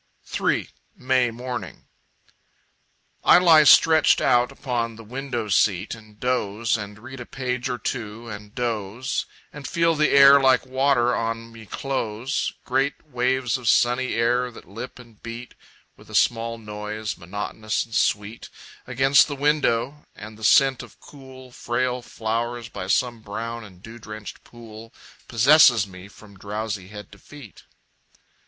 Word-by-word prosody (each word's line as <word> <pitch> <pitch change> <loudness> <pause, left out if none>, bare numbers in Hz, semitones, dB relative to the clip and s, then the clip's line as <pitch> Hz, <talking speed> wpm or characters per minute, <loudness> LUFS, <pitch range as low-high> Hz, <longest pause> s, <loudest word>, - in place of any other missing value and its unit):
3. - - -1 0.3
May 130 -1 +1
Morning 125 +2 -7 1.4
I - - +7
lie 165 -4 +6
stretched 160 +1 +6
out 120 0 +2
upon 115 -3 -3
the 115 - -12
window 120 -1 -5
seat 100 -1 +1
And 110 -2 -14
doze, 115 -3 0
and 105 -1 -6
read 130 +4 -11
a 120 - -7
page 125 -1 -3
or 125 - -2
two, 115 -2 -5
and 105 -1 -10
doze, 120 +2 -3 0.3
And 145 -2 -8
feel 165 0 +2
the 155 -1 +2
air 140 0 +8
like 130 -1 +3
water 130 -2 +2
on 115 0 -3
me 115 -2 -13
close, 130 -1 -3
Great 135 +4 -1
waves 125 0 0
of 120 -4 -1
sunny 125 +2 +2
air 120 +2 +1
that 115 - -14
lip 115 +7 -8
and 115 -4 -17
beat 115 +1 -8 0.4
With - - -19
a - - -7
small 115 0 +1
noise, 105 0 -6
monotonous 105 +5 -4
and 115 - -16
sweet, 105 +2 -1 0.4
Against 135 +2 +4
the 145 - -5
window 145 -2 0
and 110 +1 -10
the 110 - -14
scent 135 +3 +4
of - - -14
cool, 130 -2 -14
Frail 125 +1 -2
flowers 115 +1 -4
by 95 -2 -7
some 120 +3 0
brown 115 +2 -6
and 95 -3 -15
dew 115 +1 -11
drenched 110 -1 -9
pool 115 -1 -13 0.4
Possesses 120 -2 +5
me 90 0 -12
from 100 -1 -17
drowsy 105 -1 -5
head 105 0 -11
to 100 - -15
feet. 140 -2 -14
120 Hz, 150 wpm, -23 LUFS, 110-130 Hz, 1.4 s, air